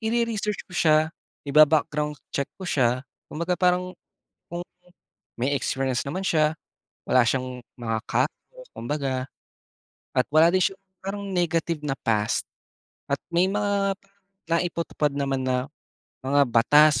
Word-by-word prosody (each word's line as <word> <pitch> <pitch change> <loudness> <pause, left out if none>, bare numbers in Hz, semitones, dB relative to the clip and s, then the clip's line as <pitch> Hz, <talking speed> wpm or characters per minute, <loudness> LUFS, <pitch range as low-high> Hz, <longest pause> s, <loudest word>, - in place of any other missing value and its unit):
ire-research 220 -2 -1
ko - - -18
siya, 155 -2 +3 0.3
iba-background 150 0 +4 0.2
check 140 - 0
ko 190 - -11
siya, 125 -6 +1 0.3
kumbaga 170 +3 -2
parang, 180 0 +2 0.6
kung 175 +1 -5 0.8
may 130 +4 0
experience 130 -2 0
naman 185 +7 -3
siya, 155 -2 +2 0.5
wala 125 -1 +6
siyang 125 0 -2 0.2
mga 115 -1 -1
ka 125 +3 +2 0.5
kumbaga. 130 0 -2 0.9
At 130 - +4
wala 155 +2 +7
din 185 - +3
siyang 195 0 0 0.2
parang 200 +1 -4
negative 165 -2 0
na 135 -2 -2
past, 105 -2 0 0.7
at - - +3 0.2
may 180 +2 +4
mga 200 -1 +1 0.5
naipatupad 170 -3 0
naman 135 -1 0
na, 130 0 0 0.6
mga 140 +2 +4
batas 135 +4 +5
150 Hz, 125 wpm, -25 LUFS, 130-180 Hz, 0.9 s, wala